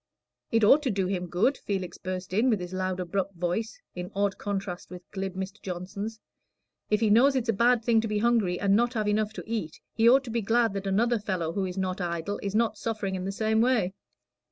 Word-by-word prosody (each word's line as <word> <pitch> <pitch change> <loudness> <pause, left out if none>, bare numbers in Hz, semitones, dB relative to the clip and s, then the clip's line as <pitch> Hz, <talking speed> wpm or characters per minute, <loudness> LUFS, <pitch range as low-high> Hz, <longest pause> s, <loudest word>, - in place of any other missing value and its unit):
"It 225 -1 +3
ought 275 +8 +7
to 280 - -1
do 195 -4 0
him 180 -1 -2
good," 195 +11 +1
Felix 190 -3 -4
burst 185 0 -5
in, 225 +6 +3
with 215 -5 +2
his 180 0 -6
loud, 185 0 -2
abrupt 190 +2 -2
voice, 180 - -2
in 180 0 -5
odd 200 0 0
contrast 195 -3 -4
with 180 -1 -9
glib 190 -2 -4
Mr. 190 +1 -5
Johnson's. 195 +4 -5 0.7
"If 210 +1 +2
he 215 -2 +3
knows 265 +6 +5
it's 245 -3 -1
a - - +4
bad 235 +2 +3
thing 230 -2 +4
to 225 - -2
be 210 -1 -1
hungry 215 -5 +2
and 200 -1 +3
not 240 +3 +2
have 215 -2 0
enough 210 0 +1
to - - -7
eat, 215 -9 -4
he 225 +1 +5
ought 265 +2 +5
to 240 - -7
be 235 0 0
glad 225 +1 +2
that 195 0 -4
another 230 +4 +2
fellow, 180 -5 -2
who 195 0 -1
is 180 0 -5
not 185 0 -2
idle, 170 +3 -2
is 200 0 -3
not 220 -2 +1
suffering 215 -4 -2
in 185 -1 -3
the 195 - -2
same 220 +2 +1
way." 230 -7 +2
200 Hz, 230 wpm, -27 LUFS, 185-225 Hz, 0.7 s, ought